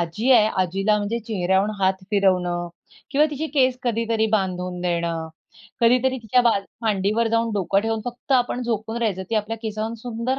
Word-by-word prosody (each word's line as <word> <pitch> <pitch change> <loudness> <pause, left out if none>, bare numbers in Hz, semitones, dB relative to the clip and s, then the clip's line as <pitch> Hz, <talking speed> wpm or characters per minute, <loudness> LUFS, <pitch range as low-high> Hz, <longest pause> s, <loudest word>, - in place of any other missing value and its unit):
आजी 170 +9 -1
आहे, 215 -3 +6 0.2
आजीला 195 +4 +1
म्हणजे 210 +3 -2
चेहऱ्यावरून 195 -1 0
हात 190 0 +1
फिरवणं 180 -3 +1 0.4
किंवा 295 +2 +4
तिची 300 +2 -3
केस 255 -3 +3
कधीतरी 230 -2 0
बांधून 180 -3 -1
देणं, 170 -2 -2 0.5
कधीतरी 255 +2 +3
तिच्या 225 +3 +3
बाज 220 -5 +2 0.2
मांडीवर 215 +2 +1
जाऊन 230 0 +1
डोकं 195 0 +1
ठेवून 225 +1 -2
फक्त 245 +3 -5
आपण 245 0 +1
झोपून 225 -1 -3
राहायचं. 210 -5 -1
ती 225 - 0
आपल्या 215 +1 -1
केसावरून 220 +1 -3
सुंदर 245 +2 -2
220 Hz, 160 wpm, -23 LUFS, 190-235 Hz, 0.5 s, आहे